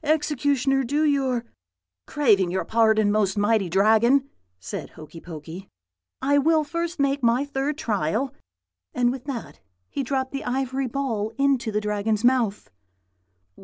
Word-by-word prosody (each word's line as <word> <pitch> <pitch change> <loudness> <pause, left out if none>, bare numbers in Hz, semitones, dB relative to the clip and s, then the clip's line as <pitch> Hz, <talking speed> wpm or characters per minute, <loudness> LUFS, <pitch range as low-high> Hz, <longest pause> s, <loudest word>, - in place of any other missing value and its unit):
Executioner, 285 -3 +1
do 290 +5 0
your 265 -5 +1 0.3
' 90 0 -64
"'Craving 210 -11 +3
your 185 +1 -2
pardon, 220 -2 +3
most 205 -2 +1
mighty 205 -2 +2
Dragon,' 220 +8 +4 0.3
said 90 - -6
Hokey 160 +1 -12
Pokey, 165 +3 -9 0.5
'I 285 +1 +3
will 315 +2 +3
first 335 +2 -4
make 280 0 +1
my 240 +3 +2
third 285 +1 -2
trial;' 220 - -1 0.6
and 245 -1 +2
with 260 0 -7
that 265 -5 -6 0.3
he - - -2
dropped 260 0 -2
the 275 - -4
ivory 265 +1 -2
ball 230 -5 -2
into 270 -4 +1
the 210 - 0
Dragon's 210 +1 -1
mouth. 240 - +1
245 Hz, 140 wpm, -24 LUFS, 210-275 Hz, 0.6 s, Dragon